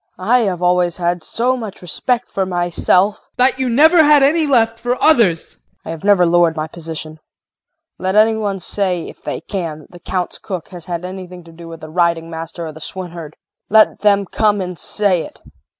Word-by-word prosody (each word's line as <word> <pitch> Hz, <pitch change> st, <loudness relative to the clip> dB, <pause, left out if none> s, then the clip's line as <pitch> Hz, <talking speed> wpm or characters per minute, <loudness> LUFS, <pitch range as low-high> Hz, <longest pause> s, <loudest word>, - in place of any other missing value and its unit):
KRISTIN. 185 Hz, +5 st, -4 dB
I 250 Hz, -, +6 dB
have 180 Hz, -1 st, -5 dB
always 180 Hz, -1 st, +2 dB
had 175 Hz, -1 st, -1 dB
so 250 Hz, +8 st, 0 dB
much 220 Hz, -7 st, -8 dB
respect 245 Hz, +7 st, -1 dB
for 195 Hz, -, -2 dB
myself 180 Hz, +2 st, +1 dB
JEAN. -, -, -33 dB
That 260 Hz, +1 st, +2 dB
you 260 Hz, -1 st, 0 dB
never 315 Hz, +7 st, +5 dB
had 295 Hz, -2 st, +5 dB
any 310 Hz, +3 st, +3 dB
left 230 Hz, -4 st, +2 dB
for 245 Hz, +2 st, -2 dB
others! 230 Hz, -, +4 dB
KRISTIN. -, -, -19 dB, 0.2 s
I -, -, -7 dB
have 165 Hz, -2 st, -8 dB
never 200 Hz, -3 st, +4 dB
lowered 170 Hz, -1 st, +3 dB
my 155 Hz, -1 st, -2 dB
position. 160 Hz, -1 st, -7 dB, 0.8 s
Let 190 Hz, +2 st, -1 dB
any 220 Hz, +1 st, +5 dB
one 205 Hz, -3 st, -2 dB
say, 185 Hz, -1 st, -2 dB
if -, -, -13 dB
they -, -, -5 dB
can, 165 Hz, -6 st, -5 dB
that -, -, -20 dB
the 175 Hz, -, -13 dB
Count's 180 Hz, 0 st, -3 dB
cook 185 Hz, -4 st, -6 dB
has 175 Hz, -3 st, -10 dB
had 175 Hz, -1 st, -4 dB
anything 180 Hz, -1 st, -8 dB
to 165 Hz, -, -15 dB
do 165 Hz, +1 st, -12 dB
with 165 Hz, -1 st, -10 dB
the 155 Hz, -, -9 dB
riding 170 Hz, 0 st, 0 dB
master 165 Hz, +1 st, -6 dB
or 160 Hz, -, -6 dB
the 160 Hz, +1 st, -13 dB
swineherd. 170 Hz, -3 st, -7 dB, 0.3 s
Let 215 Hz, +1 st, +4 dB
them 200 Hz, -1 st, +3 dB
come 205 Hz, +2 st, +1 dB
and 180 Hz, -2 st, -5 dB
say 200 Hz, -5 st, +1 dB
it! -, -, -13 dB
180 Hz, 210 wpm, -17 LUFS, 170-215 Hz, 0.8 s, I